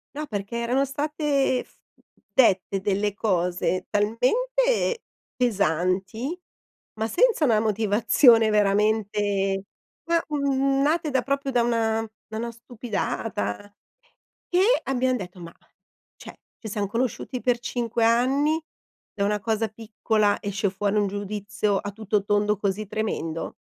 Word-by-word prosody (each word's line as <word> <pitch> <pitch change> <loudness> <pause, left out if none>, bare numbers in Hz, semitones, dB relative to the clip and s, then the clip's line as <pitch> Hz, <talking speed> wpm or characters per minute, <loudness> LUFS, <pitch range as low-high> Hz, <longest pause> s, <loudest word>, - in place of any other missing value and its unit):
No, 305 - -3
perché 205 0 -4
erano 250 +4 +1
state 285 -2 0
f - - -28 0.6
dette 195 -6 +3
delle 205 +1 0
cose 180 -2 0
talmente 470 - +1 0.3
pesanti, 200 - 0 0.6
ma 220 - 0
senza 415 - +3
una 225 -4 +3
motivazione 220 +2 +4
veramente 205 -1 +1 0.5
ma, 335 0 +3
mhmm, 275 -2 +1
nate 310 +2 +1
da 260 - +2
proprio 275 +2 -2
da 245 -2 +3
una 225 -1 0 0.2
da 220 - -5
una 235 +1 -3
stupidata. 225 - -4 0.8
E 360 +1 +3 0.2
abbiam 260 -1 +1
detto: 180 -3 -8
"Ma 170 -1 -9 0.6
cioè, - - -11 0.2
ci 220 - -7
siam 205 0 -2
conosciuti 245 +3 -2
per 245 -1 +1
5 235 -1 -2
anni, 270 +7 +2 0.5
da 200 -2 -1
una 210 +1 0
cosa 225 +1 0
piccola 215 -1 0
esce 200 0 -1
fuori 200 +2 -1
un 205 -1 +2
giudizio 205 0 -2
a 205 - -4
tutto 210 -1 -1
tondo 205 0 +2
così 205 +1 -2
tremendo?" 165 -7 -3
220 Hz, 125 wpm, -25 LUFS, 205-255 Hz, 0.8 s, motivazione